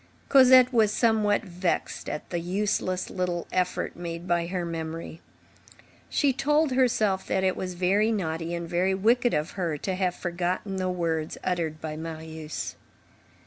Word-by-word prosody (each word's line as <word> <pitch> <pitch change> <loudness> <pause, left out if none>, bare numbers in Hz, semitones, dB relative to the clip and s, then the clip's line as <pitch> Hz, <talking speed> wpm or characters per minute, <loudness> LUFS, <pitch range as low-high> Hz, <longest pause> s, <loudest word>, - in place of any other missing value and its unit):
Cosette 255 -2 +7
was 220 -3 +4
somewhat 215 -2 +2
vexed 180 -2 -2
at 150 - -5
the 175 - -1
useless 185 +1 -1
little 180 -2 -2
effort 180 -1 -1
made 170 0 -6
by 170 -1 +1
her 180 -1 -2
memory. 165 0 -5 0.9
She 280 -2 +2
told 295 +2 +2
herself, 220 -7 +2
that 190 - 0
it 185 -1 +2
was 185 -1 -4
very 195 +5 +2
naughty 170 -4 -2
and 170 0 -4
very 180 +3 +1
wicked 235 +5 +3
of 150 +1 -1
her, 170 -6 -2
to 190 +6 -3
have 185 -1 0
forgotten 180 +2 -2
the 185 0 -1
words 165 -3 -2
uttered 165 -4 -1
by 155 -1 -5
Marius. 160 -1 -6
180 Hz, 150 wpm, -27 LUFS, 170-210 Hz, 0.9 s, Cosette